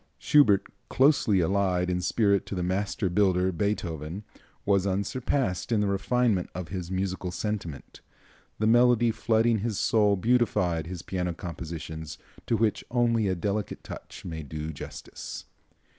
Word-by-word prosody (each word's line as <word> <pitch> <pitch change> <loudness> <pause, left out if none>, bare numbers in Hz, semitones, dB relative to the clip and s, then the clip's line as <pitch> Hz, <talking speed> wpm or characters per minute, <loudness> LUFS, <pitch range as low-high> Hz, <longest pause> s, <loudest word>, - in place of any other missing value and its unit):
Schubert, 105 -10 +4 0.2
closely 130 -8 +4
allied 90 0 +1
in 90 0 -1
spirit 100 +1 +2
to - - -4
the 90 - -2
master 95 +2 -1
builder, 95 -1 +2
Beethoven, 85 -2 -3 0.4
was 100 -1 +2
unsurpassed 100 0 -1
in 110 - +3
the 105 - +2
refinement 100 0 +1
of 90 -3 -5
his 90 -2 -5
musical 95 -1 -2
sentiment. 90 -5 -5 0.6
The 110 - 0
melody 120 0 +5
flooding 115 0 +2
his 110 -1 -2
soul 105 -2 +3
beautified 95 -7 +1
his 90 -1 -6
piano 90 -2 -2
compositions, 80 -2 -6 0.3
to 115 - +2
which 110 -1 +1
only 115 -3 +2
a 95 - +1
delicate 100 +2 -3
touch - - -10
may 80 -2 -5
do 75 +2 -5
justice. 70 - -8
95 Hz, 140 wpm, -27 LUFS, 90-110 Hz, 0.6 s, melody